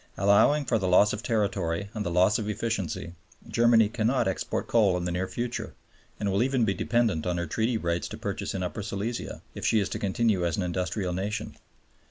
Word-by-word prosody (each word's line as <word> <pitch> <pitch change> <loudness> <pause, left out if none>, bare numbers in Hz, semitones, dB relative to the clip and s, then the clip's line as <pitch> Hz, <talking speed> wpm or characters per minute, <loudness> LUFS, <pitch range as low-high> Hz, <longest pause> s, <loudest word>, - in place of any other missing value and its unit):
Allowing 100 +10 +4
for 115 -4 +1
the 95 - -1
loss 95 +3 +5
of 105 - -4
territory 100 -4 -1
and 110 - -3
the 90 - -2
loss 90 +5 +3
of 105 -1 -3
efficiency, 100 -7 -3 0.3
Germany 115 -2 +4
cannot 115 +2 0
export 95 - -2
coal 105 -6 +3
in 90 - -3
the 90 - -1
near 90 +2 -1
future 120 +3 -4 0.4
(and 100 -2 0
will 100 +3 +1
even 130 -2 +2
be 100 - +1
dependent 110 -8 0
on 90 -1 0
her 85 - -1
Treaty 115 +8 0
rights 85 -3 -1
to - - -8
purchase - - -4
in 95 - -2
Upper 90 +4 -4
Silesia), 105 +3 -4
if - - -8
she 110 - +3
is 100 - -1
to - - -4
continue 100 -1 +1
as 85 -2 0
an 95 - 0
industrial 90 +1 -2
nation. 105 +4 -3
100 Hz, 210 wpm, -27 LUFS, 90-115 Hz, 0.4 s, loss